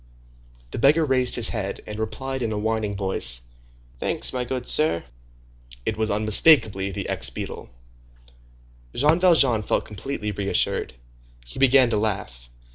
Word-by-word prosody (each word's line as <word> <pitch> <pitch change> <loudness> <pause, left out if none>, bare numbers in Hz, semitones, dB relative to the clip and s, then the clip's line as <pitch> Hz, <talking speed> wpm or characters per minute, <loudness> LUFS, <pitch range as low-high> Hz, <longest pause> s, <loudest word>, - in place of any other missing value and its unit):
The - - -5
beggar 150 +6 +4
raised 130 -3 +2
his 120 -3 +4
head, 100 -3 -4
and 105 0 -7
replied 130 +4 -4
in 115 -2 -2
a 105 - -3
whining 110 -1 -2
voice, 65 -12 +2 0.6
"Thanks, - - -3
my 125 -1 -2
good 125 0 -4
sir." 150 - +1 0.8
It 110 - -1
was 110 0 -1
unmistakably 105 -1 +3
the 95 - -5
ex 65 0 0
beadle. 65 - -7 1.3
Jean 150 +6 +3
Valjean 145 -11 +4
felt - - -1
completely 105 0 -5
reassured. 100 -8 -1 0.5
He - - -10
began 130 -2 +4
to 110 - +1
laugh. 100 - -4
110 Hz, 140 wpm, -23 LUFS, 100-130 Hz, 1.3 s, beggar